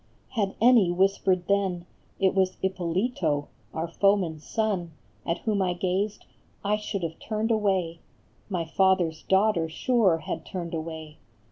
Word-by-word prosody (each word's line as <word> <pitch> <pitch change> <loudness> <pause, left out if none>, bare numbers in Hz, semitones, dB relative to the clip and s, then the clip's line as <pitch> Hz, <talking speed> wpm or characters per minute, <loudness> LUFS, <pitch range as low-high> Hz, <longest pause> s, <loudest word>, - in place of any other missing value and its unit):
Had 205 -5 -1
any 230 -5 +6
whispered 185 0 +2
then 190 -3 0 0.3
It 190 -1 +3
was 190 -1 +1
Ippolito, 180 - -1 0.2
our 160 +1 -3
foeman 185 -2 +2
s 150 - -17
son, 200 -7 -1 0.3
At 170 - +1
whom 210 -3 0
I 180 -1 +1
gazed, 195 +4 -1 0.4
I 210 +1 +2
should 210 -3 -4
have 165 -1 -4
turned 220 +1 -2
away, 190 -6 +1 0.5
My 175 -4 -1
father 190 0 +3
s 160 0 -13
daughter 190 -4 +2
sure 200 0 +2
had 160 0 -5
turned 170 -1 -6
away. 160 -1 -6
185 Hz, 145 wpm, -27 LUFS, 170-200 Hz, 0.5 s, any